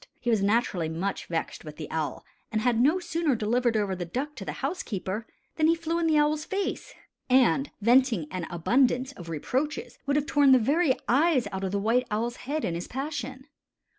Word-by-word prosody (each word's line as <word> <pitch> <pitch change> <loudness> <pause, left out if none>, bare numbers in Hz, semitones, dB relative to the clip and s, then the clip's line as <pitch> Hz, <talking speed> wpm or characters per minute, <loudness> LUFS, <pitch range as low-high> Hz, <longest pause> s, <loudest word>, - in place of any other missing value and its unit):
He 240 - 0
was 220 -3 +2
naturally 200 -5 +1
much 175 +5 -3
vexed 165 -1 -3
with 150 -1 -9
the 155 - -7
owl, 160 -2 -3 0.3
and 215 - 0
had 235 -1 +2
no 300 +8 +4
sooner 335 -5 0
delivered 230 +1 +1
over 200 -3 0
the 180 - -4
duck 260 - -4
to 205 - -6
the - - -4
housekeeper, 220 - -3 0.3
than 310 -1 +4
he 330 - +4
flew 335 0 -2
in 335 - +1
the 310 -1 +3
owl's 300 +1 +2
face 390 +4 -3 0.3
and, 265 +2 +4
venting 235 - +4
an 180 -3 -4
abundance 250 +9 +2
of 175 -10 -11
reproaches, 260 - -3
would 280 - +2
have 295 -1 +1
torn 285 -2 +5
the - - +8
very 280 +4 +2
eyes 275 0 +3
out 190 0 -4
of 190 - -1
the 200 - 0
White 230 +5 +1
Owl's 230 +3 -2
head 295 +4 -3
in 170 - -1
his 170 +1 -4
passion. 265 -1 -5
245 Hz, 200 wpm, -27 LUFS, 200-290 Hz, 0.3 s, the